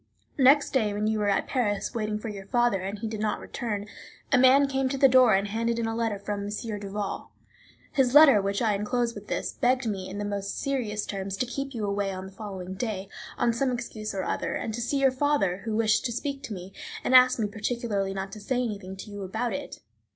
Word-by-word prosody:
Next 275 +2 +5
day, 220 -6 +1
when 210 +1 -1
you 215 0 +1
were 205 -1 +1
at 200 - +1
Paris, 210 -6 -1
waiting 215 -2 -1
for 215 - -6
your 200 -2 -8
father, 240 -4 +2
and 195 +2 -4
he 220 - -4
did 220 -1 -5
not 215 0 -1
return, 210 -4 -4 0.5
a 275 - +5
man 265 +2 +6
came 270 -1 0
to 275 - -2
the 270 0 +7
door 255 -5 +6
and 200 +1 +1
handed 230 +2 -1
in 230 - -1
a 225 - -1
letter 225 -2 -1
from 200 0 -4
M. 210 0 -4
Duval. 200 0 -4 0.6
His 265 -1 +2
letter, 285 -8 +9
which 200 +3 -1
I 215 -2 +3
inclose 235 +4 0
with 205 -1 -10
this, - - -2
begged 250 +1 +1
me, 195 -4 -3
in 195 - -6
the 205 - -3
most 200 -1 -3
serious 230 -7 -2
terms, 195 -1 -4
to 255 - 0
keep 275 +2 -5
you 215 -2 -2
away 200 -1 -1
on 185 0 -6
the 190 - -10
following 190 -3 -7
day, 195 -2 -4 0.3
on 235 - +2
some 265 +3 0
excuse 225 -4 -5
or 190 - -1
other, - - -2
and 220 - -3
to 240 - -3
see 275 +4 0
your 270 -1 +4
father, 260 -9 +1
who 220 -1 -1
wished 220 -1 +2
to 240 - 0
speak 275 +3 -3
to 220 - -6
me, 185 0 -8 0.3
and - - 0
asked 255 0 +7
me 220 -3 0
particularly 205 -2 -2
not 195 0 -4
to 215 - -8
say 235 +6 -2
anything 200 -5 -5
to 205 +2 -9
you 205 0 -7
about 220 +5 -2
it. 285 - -6
215 Hz, 240 wpm, -27 LUFS, 200-245 Hz, 0.6 s, letter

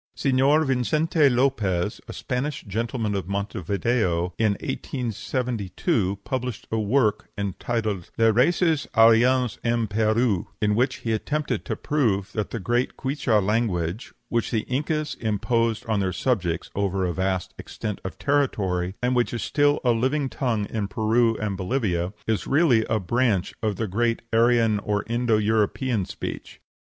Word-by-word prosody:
Señor 140 +3 +3
Vincente 150 +4 +2
Lopez, 120 -9 0
a - - -7
Spanish 135 +3 -3
gentleman 110 +1 -2
of 95 -3 -3
Montevideo, 100 -2 -1
in 110 -2 +3
1872 115 - -2
published 125 -3 -4
a 110 - 0
work 110 0 +1
entitled 100 -1 -2
"Les 115 -1 +5
Races 155 - +2
Aryennes 120 +1 +4
in 115 -1 +1
Pérou," 110 -1 +1
in 105 -1 +2
which 125 +5 +1
he 115 - 0
attempts 150 +7 -1
to - - -2
prove 115 -11 0
that 105 -2 -2
the 115 - -4
great 120 +5 -1
Quichua 130 -7 +1
language, 105 -3 -1 0.2
which 115 -1 0
the 110 -3 0
Incas 150 +3 -2
imposed 115 +1 0
on 110 -2 0
their 95 -2 0
subjects 90 -9 -1
over 100 -1 0
a 90 - -1
vast 95 0 -1
extent 105 -2 -5
of 95 - -6
territory, 100 -11 0
and 125 +1 +2
which 120 -1 +1
is 120 - -3
still 145 0 +2
a 125 - +4
living 130 +4 0
tongue 120 -8 -1
in 105 -3 -2
Peru 115 +2 +2
and 105 -2 -2
Bolivia, 95 -3 -1
is 110 -2 -1
really 135 -6 +4
a 110 - 0
branch 105 -1 0
of 110 -3 0
the 110 +3 -2
great 115 +4 0
Aryan 115 -2 +4
or 105 0 -1
Indo 120 -1 +1
European 110 +1 +1
speech. - - -7
115 Hz, 145 wpm, -24 LUFS, 100-125 Hz, 0.2 s, Les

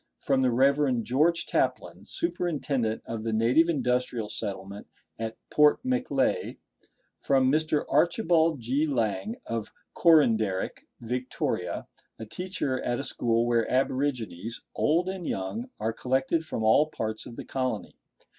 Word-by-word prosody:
From 135 -2 +1
the 130 - +3
Rev. 135 0 +3
George 160 +8 +2
Taplin, - - -1
superintendent 145 - -1
of 115 -1 -5
the 115 - -1
native 120 +10 +3
Industrial 125 -6 0
Settlement 100 -1 -5 0.3
at 115 0 -4
Port 150 0 +5
Macleay. 255 - 0 0.6
From 135 -2 +3
Mr. 155 0 +1
Archibald 165 - +2
G. 135 +7 0
Lang, 110 -5 -1
of 115 -2 -4 0.2
Coranderik, 110 - +3
Victoria, 120 -7 -3 0.3
a 110 - -7
teacher 140 - -3
at 120 0 -1
a - - -3
school 115 -3 0
where 120 -1 +1
aborigines, 125 -6 -1
old 170 +4 +2
and 185 -3 -4
young, 160 - -3
are 110 +1 -1
collected 130 +7 0
from 115 -8 -4
all 110 +8 +5
parts 110 -7 -4
of 120 - -10
the - - -7
colony. 130 -5 -3
130 Hz, 130 wpm, -27 LUFS, 115-155 Hz, 0.6 s, Port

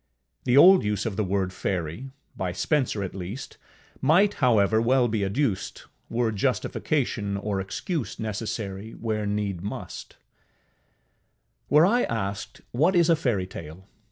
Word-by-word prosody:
The 125 +1 +3
old 185 +5 +8
use 105 -1 -1
of 110 -4 -2
the 110 - 0
word 95 -1 -1
Fairy, 90 - -3 0.3
by 90 -2 -3
Spenser 125 - 0
at 95 - -5
least, 95 +7 -7 0.4
might, 185 +9 +4
however, 110 -3 +4
well 125 +1 +3
be 110 -3 -1
adduced, 100 -1 -2 0.2
were 115 -1 0
justification 105 0 -1
or 100 -1 -2
excuse 150 - -4
necessary 110 -1 -4
where 110 -2 -2
need 100 -3 -2
must. 100 - -7 1.5
Were 150 +4 +6
I 240 +6 +3
asked, 100 -3 -4
what 160 +10 +2
is 170 -1 +5
a - - +6
fairytale? 95 - -4
110 Hz, 130 wpm, -26 LUFS, 100-130 Hz, 1.5 s, old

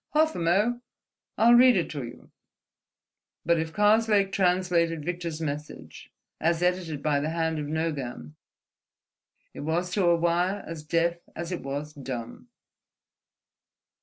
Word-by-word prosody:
Half 315 +1 +4
a - - -3
mo': 205 +9 +1 0.6
I'll 235 +2 +6
read 245 -2 +7
it 175 - -1
to 145 -3 -4
you 120 +1 -11 0.5
..." - - -64
But 170 -1 +3
if 160 0 -3
Karslake 210 0 +3
translated 180 -4 +1
Victor's 170 -2 -4
message, 145 - -7 0.3
as 170 +1 +1
edited 180 -5 -1
by 150 -2 +2
the 150 +2 -2
hand 160 -1 -1
of 150 - -4
Nogam, 140 - -3 1.2
it - - -10
was 170 +4 -1
to 190 0 +1
a 170 0 +5
wire 175 +4 0
as 165 -2 -7
deaf 170 +3 0 0.2
as 170 +1 -5
it 180 - -3
was 145 +2 -5
dumb. 130 -5 -7
170 Hz, 140 wpm, -27 LUFS, 150-180 Hz, 1.2 s, read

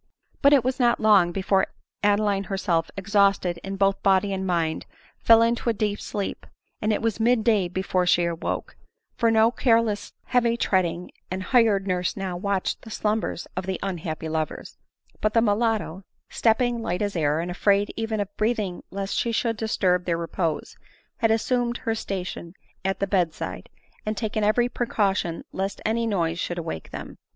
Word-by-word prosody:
But 280 - +6
it 280 -4 +5
was 255 +2 -1
not 240 -1 +3
long 200 -5 +5
before 190 +1 +1 0.3
Adeline 205 -1 +2
herself, 185 -5 0
exhausted 195 -3 +2 0.2
both 195 0 +3
in - - -39
body 195 0 +3
and 190 0 -2
mind, 165 -3 -1 0.3
fell 230 0 +6
into 235 +1 +1
a - - +2
deep 210 -1 -2
sleep; 200 -1 -4 0.3
and 215 - +1
it 215 - -1
was 225 -2 0
mid 230 0 +3
day 210 -5 +3
before 185 0 -1
she 175 0 +4
awoke; 170 -1 -3 0.4
for 230 - +2
no 225 +1 +4
careless, 230 -4 +1
heavy 235 -2 +2
tread 190 -5 +2
ing, 170 +1 -5 0.2
and 185 +1 -3
hired 220 -4 +3
nurse 180 -1 -1
now 190 -2 -3
watched 195 +1 -1
the 225 - -11
slumbers 215 -3 -1
of 185 +1 -4
the 190 - -2
unhappy 165 -4 -4
lovers; 155 -1 -4 0.4
but 215 +1 0
the 230 - +6
mulatto, 215 -4 0 0.3
stepping 235 +1 +2
light 180 -1 -1
as 205 -1 -2
air, 150 -2 +1
and 175 +2 -3
afraid 200 +3 +2
even 225 -1 -2
of 205 0 -4
breathing 215 -5 -1
lest 195 0 -4
she 235 - 0 0.2
would 225 - 0
disturb 185 -5 +1
their 170 -2 0
repose, 165 -1 -3 0.4
had 225 - +2
assumed 240 +2 +1
her 225 - -2
station 185 -4 -5 0.3
at 195 0 -1
the 200 - +1
bed 180 -5 +1
side, - - -6 0.3
and 215 0 -3
taken 215 -1 -1
every 220 +4 +3
precaution 195 -8 -1
lest 195 +1 -3
any 230 +1 +1
noise 170 -5 0
should 175 - -3
awake 160 - -5
them. - - -8
200 Hz, 175 wpm, -25 LUFS, 180-225 Hz, 0.4 s, But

